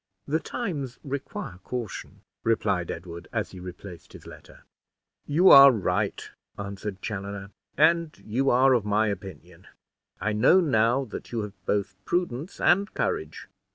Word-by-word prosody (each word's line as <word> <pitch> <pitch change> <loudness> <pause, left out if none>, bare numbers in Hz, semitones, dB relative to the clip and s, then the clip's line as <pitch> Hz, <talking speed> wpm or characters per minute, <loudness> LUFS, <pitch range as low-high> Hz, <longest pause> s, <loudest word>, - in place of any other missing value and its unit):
"The 155 +3 0
times 150 - -4
require 135 -9 -6
caution," 120 -6 -6 0.2
replied 100 -6 0
Edward, 85 0 -7
as - - -2
he 95 - -10
replaced 90 0 -10
his - - -13
letter. - - -14 0.6
"You 170 +6 +5
are 140 0 +11
right," 100 -2 -1 0.3
answered 100 -1 -6
Chaloner, 100 -1 -5 0.3
"and 165 +1 +3
you 130 +6 0
are 130 +2 +5
of 120 -4 +2
my 105 +1 +1
opinion. 90 -2 -8 0.5
I 110 - -1
know 120 - +5
now 130 -4 +2
that 110 - -9
you 115 -2 -2
have 105 -1 -7
both 100 -1 -1
prudence 175 -2 -2
and 200 +4 +3
courage. 425 -3 -3
110 Hz, 140 wpm, -26 LUFS, 100-140 Hz, 0.6 s, are